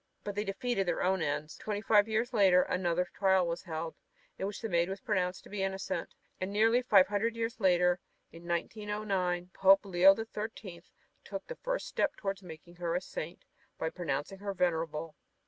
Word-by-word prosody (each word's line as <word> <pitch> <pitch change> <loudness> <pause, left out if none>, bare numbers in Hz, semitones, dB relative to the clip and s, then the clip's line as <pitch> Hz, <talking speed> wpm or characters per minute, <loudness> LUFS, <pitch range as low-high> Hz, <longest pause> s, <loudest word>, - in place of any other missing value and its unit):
But 205 - -4
they 205 +1 -1
defeated 195 0 -1
their 175 - 0
own 190 -1 +2
ends, 150 0 -2
for - - -15
twenty 210 -1 -2
five 210 -1 +4
years 225 +2 0
later 190 -4 +5
another 180 -1 0
trial 190 -2 +3
was 170 0 -3
held 160 -1 -4 0.5
in 195 - -1
which 205 - -5
the 225 - -3
Maid 170 -2 +1
was 195 +1 -4
pronounced 185 -4 -1
to - - -14
be 205 -2 -3
innocent. 190 0 -3 0.2
And 185 +1 -3
nearly 225 +4 +4
five 205 -7 +6
hundred 215 +3 -1
years 230 +2 -3
later, 180 -2 +3 0.3
in 170 +1 -12
1909, 185 -1 -2
Pope 195 +1 +5
Leo 190 +1 +6
the 225 - -4
Thirteenth 210 -5 -7 0.3
took - - -6
the - - -7
first - - -2
step - - 0
toward 195 -1 -3
making 170 0 -12
her 170 -1 -1
a - - +2
Saint 170 -1 -7 0.3
by 160 - -2
pronouncing 175 +2 -3
her 200 -1 -4
"venerable." 165 -3 -1
190 Hz, 190 wpm, -31 LUFS, 175-210 Hz, 0.5 s, five